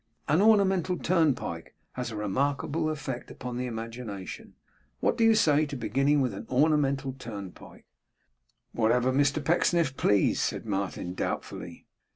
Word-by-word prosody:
An 155 +6 +3
ornamental 195 -4 +3
turnpike 150 - 0 0.2
has 125 -1 -4
a 110 - -7
remarkable 140 +9 -1
effect 135 -5 -5
upon 125 -1 -6
the 125 0 -2
imagination. 115 -4 -7 0.4
What - - +1
do 230 - +1
you 225 0 +6
say 155 -6 +3
to 140 - -6
beginning 135 +5 +1
with 125 -5 0
an 95 - -8
ornamental 140 -1 +2
turnpike?' 105 -8 -10 0.9
'Whatever 120 +3 +2
Mr 145 +1 +1
Pecksniff 165 -3 +2
pleased,' 100 -2 +2
said - - -2
Martin, 100 -3 -3
doubtfully. - - -5
135 Hz, 135 wpm, -28 LUFS, 115-155 Hz, 0.9 s, you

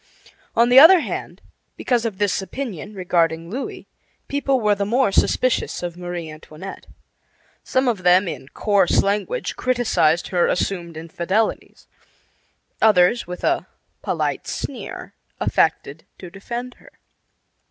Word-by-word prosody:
On 235 +1 +4
the 250 +2 +8
other 335 +4 +9
hand, - - -6 0.4
because 240 -2 0
of 215 -4 -3
this 205 -1 0
opinion 210 - -6
regarding 170 -2 0
Louis, 260 +5 -6 0.4
people 275 -2 0
were 210 -2 +2
the 200 0 -2
more 235 +2 +1
suspicious 255 -2 +1
of 175 -1 -4
Marie 175 -2 -6
Antoinette. 155 +4 -10 0.8
Some 260 0 0
of 225 -6 0
them, 180 +2 +4
in 145 -5 -6
coarse 200 +3 +2
language, 210 - -2
criticized 225 -10 +1
her 175 -2 +2
assumed 175 -3 -2
infidelities; 170 +6 -2 1.0
others, 210 +1 +4
with 180 0 -7
a - - 0 0.3
polite - - -2
sneer, - - -6 0.3
affected 150 +3 0
to 180 -2 -10
defend 240 +6 -7
her. - - -18
195 Hz, 125 wpm, -21 LUFS, 175-240 Hz, 1.0 s, other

